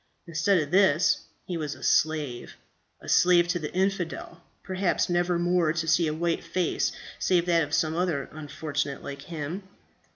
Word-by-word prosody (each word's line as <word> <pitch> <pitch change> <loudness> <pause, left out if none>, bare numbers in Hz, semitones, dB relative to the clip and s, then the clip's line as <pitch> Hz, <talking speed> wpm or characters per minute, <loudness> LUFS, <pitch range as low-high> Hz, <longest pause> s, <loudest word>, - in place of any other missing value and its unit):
Instead 170 +4 +2
of 150 -2 -3
this 185 -4 +3 0.2
he 175 - -3
was 150 -2 -3
a - - -13
slave 150 -6 0 0.5
a - - -12
slave 175 -1 +5
to 175 0 0
the 150 -2 -5
infidel, 180 -3 -2 0.2
perhaps 185 -1 0
never 175 0 +1
more 175 -2 +2
to 165 -1 -2
see 165 +1 +3
a - - 0
white 165 +2 -1
face, 175 +1 0 0.3
save 175 -2 +2
that 170 -1 +3
of 145 -2 -3
some 160 0 +1
other 170 -6 -1
unfortunate 145 -2 -4
like 140 0 -7
himself. 160 +4 -5
170 Hz, 165 wpm, -27 LUFS, 155-180 Hz, 0.5 s, slave